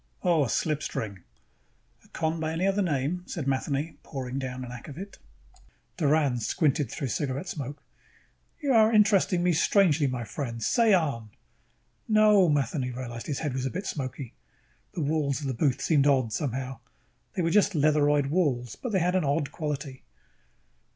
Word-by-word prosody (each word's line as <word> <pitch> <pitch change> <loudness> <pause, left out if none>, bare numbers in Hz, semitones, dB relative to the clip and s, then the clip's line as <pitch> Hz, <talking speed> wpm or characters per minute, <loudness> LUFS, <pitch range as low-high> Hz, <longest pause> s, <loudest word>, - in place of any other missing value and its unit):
Oh. 170 -4 +3
A 130 - -2
slipstring." 110 -9 -2 0.8
"A - - -22
con 160 0 -2
by 160 0 -2
any 170 +3 0
other 195 +1 +2
name," 160 0 -1
said 160 -7 -4
Matheny, 140 +3 -1
pouring 135 -2 -5
down 130 -1 -5
an 120 - -9
akvavit. 145 - -9 0.8
Doran 145 -5 +2
squinted 145 - +1
through 135 - -4
cigarette 140 - -2
smoke. 140 -3 -6 0.8
"You 280 -3 +1
are 220 -1 +5
interesting 200 -5 +3
me 180 -1 +3
strangely, 160 -3 +3
my 125 -2 -3
friend. 115 -1 -5
Say 230 -2 +3
on." 140 -11 -1 0.8
"No." 215 -4 +5
Matheny 140 -2 0
realized 120 -2 -6
his 145 - -2
head 145 - -1
was 130 0 -2
a - - -2
bit 185 +8 -5
smoky. 130 -5 -5 0.6
The 170 - -2
walls 145 -2 0
of - - -5
the 135 - -1
booth 135 +2 0
seemed 145 -3 +3
odd, 130 -6 +2
somehow. 130 0 -3 0.5
They 180 - -1
were 165 - +1
just 205 +1 +3
leatheroid 145 -1 +3
walls, 130 - 0
but 250 - -5
they 190 - +3
had 180 +1 +1
an 185 - +2
odd 145 0 0
quality. 140 -4 -4
145 Hz, 165 wpm, -27 LUFS, 130-170 Hz, 0.8 s, are